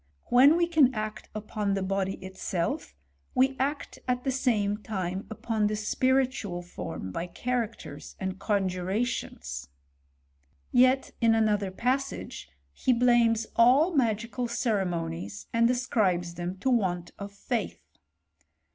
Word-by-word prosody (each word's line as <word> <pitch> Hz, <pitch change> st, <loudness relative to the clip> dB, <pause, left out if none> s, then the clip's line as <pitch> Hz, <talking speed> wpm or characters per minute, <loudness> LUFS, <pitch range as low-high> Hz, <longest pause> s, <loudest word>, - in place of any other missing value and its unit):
When 270 Hz, +6 st, +7 dB
we 345 Hz, -, +3 dB
can 300 Hz, -7 st, +4 dB
act 215 Hz, 0 st, -4 dB
upon 210 Hz, -1 st, -2 dB
the 195 Hz, -, -1 dB
body 195 Hz, 0 st, -1 dB
itself, 185 Hz, -, -3 dB, 0.4 s
we 265 Hz, +1 st, +3 dB
act 280 Hz, +3 st, -2 dB
at 250 Hz, 0 st, 0 dB
the 270 Hz, -, 0 dB
same 220 Hz, -6 st, +1 dB
time 190 Hz, -3 st, -4 dB
upon 220 Hz, -1 st, -1 dB
the 215 Hz, -, -1 dB
spiritual 250 Hz, -4 st, 0 dB
form 95 Hz, -, -6 dB
by 170 Hz, -, -3 dB
characters 225 Hz, -8 st, -4 dB
and 190 Hz, 0 st, -3 dB
conjurations.* 190 Hz, -, -2 dB, 1.0 s
Yet, 255 Hz, +2 st, +4 dB
in 225 Hz, -1 st, +5 dB
another 210 Hz, -3 st, +2 dB
passage, 255 Hz, -, -2 dB, 0.2 s
he 255 Hz, -, +2 dB
blames 235 Hz, -2 st, +4 dB
all 270 Hz, +9 st, +5 dB
magical 235 Hz, -2 st, 0 dB
ceremonies, 175 Hz, -, -2 dB
and 230 Hz, 0 st, +4 dB
as 250 Hz, 0 st, 0 dB
cribes 180 Hz, -8 st, +1 dB
them 175 Hz, +2 st, -4 dB
to 260 Hz, -, +2 dB
want 180 Hz, -7 st, 0 dB
of 200 Hz, 0 st, -6 dB
faith. 215 Hz, +2 st, -3 dB
215 Hz, 125 wpm, -28 LUFS, 190-250 Hz, 1.0 s, When